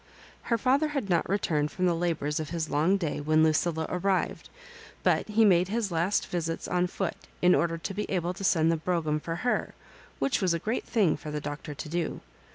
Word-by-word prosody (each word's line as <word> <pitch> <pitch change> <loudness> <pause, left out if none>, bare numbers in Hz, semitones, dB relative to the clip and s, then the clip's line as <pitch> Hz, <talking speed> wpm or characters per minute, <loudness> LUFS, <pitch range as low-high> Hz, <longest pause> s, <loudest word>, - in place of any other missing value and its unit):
Her 230 - +3
father 270 +6 +2
had 275 -10 -3
not 170 -1 +1
returned 155 -7 +1
from 185 +3 -2
the 175 - +3
labours 165 -3 -1
of 155 -2 -4
his 165 -1 -3
long 165 +7 +3
day 160 -6 -2
when 155 +1 +3
Lucilla 160 +1 +1
arrived, 185 +1 -1 0.5
but - - +2
he 220 +1 +4
made 180 -3 +4
his 215 -1 -1
last 170 +5 +1
visits 165 -2 -3
on 180 0 +1
foot 185 0 -2 0.3
in 180 0 +6
order 165 -1 +1
to 180 +4 -5
be 210 +2 -3
able 180 -2 -1
to 195 - -8
send 165 -3 +3
the 165 - +1
brougham 155 -2 0
for 165 +2 -4
her, 245 - 0 0.4
which 275 - 0
was 180 -3 +2
a - - +1
great 220 +8 -2
thing 205 -8 +2
for 155 - -8
the 150 0 -3
Doctor 145 0 -6
to 155 - -6
do. 170 +1 -2
175 Hz, 210 wpm, -28 LUFS, 160-195 Hz, 0.5 s, in